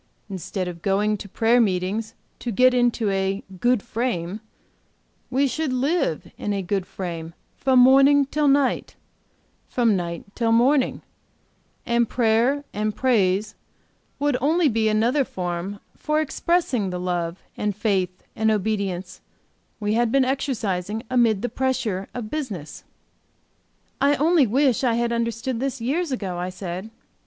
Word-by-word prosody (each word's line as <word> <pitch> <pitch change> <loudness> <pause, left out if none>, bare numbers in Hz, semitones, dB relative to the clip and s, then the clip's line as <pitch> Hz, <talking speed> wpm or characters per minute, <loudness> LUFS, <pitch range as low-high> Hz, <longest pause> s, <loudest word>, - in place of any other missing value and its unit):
Instead 185 0 -4
of 170 -1 -7
going 205 +3 +1
to 200 0 -9
prayer 230 +5 +3
meetings 205 +2 -1 0.2
to 240 - -3
get 255 +4 +4
into 240 -4 +2
a 195 +1 -1 0.2
'good 240 -1 +2
frame' 210 -5 -3 0.9
we 270 +2 +2
should 310 +1 -2
live 270 - 0
in 205 - -2
a 195 -1 -2
good 185 0 -2
frame 170 -3 -6 0.2
from 260 -1 +2
morning 275 +3 +6
till 295 +2 0
night, 275 -1 +2 0.7
from 235 -4 +2
night 170 -2 -3
till 230 -2 0
morning, 255 +4 +3 0.8
and 235 -1 +1
prayer 240 +4 +2
and 210 0 -1
praise 210 -5 +1 0.6
would 290 0 +1
be 250 - -1
only 280 -6 +2
another 230 +7 +2
form 180 -1 -4 0.2
for 305 0 0
expressing 310 - 0
the 180 0 -4
love 175 -1 -3
and 210 -2 -2
faith 190 -4 -1
and 220 0 +2
obedience 200 -3 -2 0.6
we 210 0 0
had 235 0 +2
been 270 0 +4
exercising 220 -6 -2
amid 230 -4 +3
the - - +1
pressure 245 -8 -2
of 230 -4 -5
business." 215 - -5 1.2
"I 285 +1 +4
only 310 -2 +4
wish 265 +2 +2
I 240 -3 +2
had 235 0 0
understood 235 +1 -2
this 270 0 -2
years 290 +7 -1
ago," 190 -8 -3
I 180 +1 -2
said. 185 +2 -6
225 Hz, 140 wpm, -23 LUFS, 195-260 Hz, 1.2 s, morning